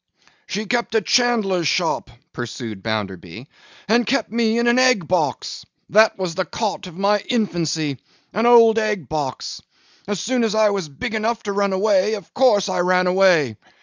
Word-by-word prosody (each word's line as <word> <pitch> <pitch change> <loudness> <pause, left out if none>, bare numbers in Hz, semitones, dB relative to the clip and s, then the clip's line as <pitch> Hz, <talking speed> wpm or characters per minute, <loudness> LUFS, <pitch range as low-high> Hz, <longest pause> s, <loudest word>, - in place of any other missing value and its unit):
'She 210 +2 -3
kept 235 0 -2
a 220 - +3
chandler's 215 -8 +1
shop,' 165 -4 0 0.2
pursued 115 -4 -6
Bounderby, 100 0 -5 0.4
'and 235 +3 +3
kept 270 -2 0
me 230 0 +1
in 235 - +1
an 240 +1 +3
egg 250 -10 +3
box. 155 -9 -2 0.3
That 215 +2 +5
was 185 -3 -3
the 185 - -1
cot 205 -1 -4
of 175 -1 -12
my 205 +2 +2
infancy; 165 - -2 0.3
an 225 +3 +1
old 230 -2 +6
egg 210 - -2
box. 145 -5 -4 0.5
As 205 -2 -2
soon 250 +6 0
as 220 -1 0
I 215 -1 +3
was 195 -6 -3
big 180 - -6
enough 225 +1 -1
to 205 - -3
run 200 0 0
away, 200 +1 +2
of 200 -6 -11
course 210 -7 +3
I 185 -2 -2
ran 180 +1 +2
away. 180 - +3
200 Hz, 175 wpm, -20 LUFS, 165-220 Hz, 0.5 s, old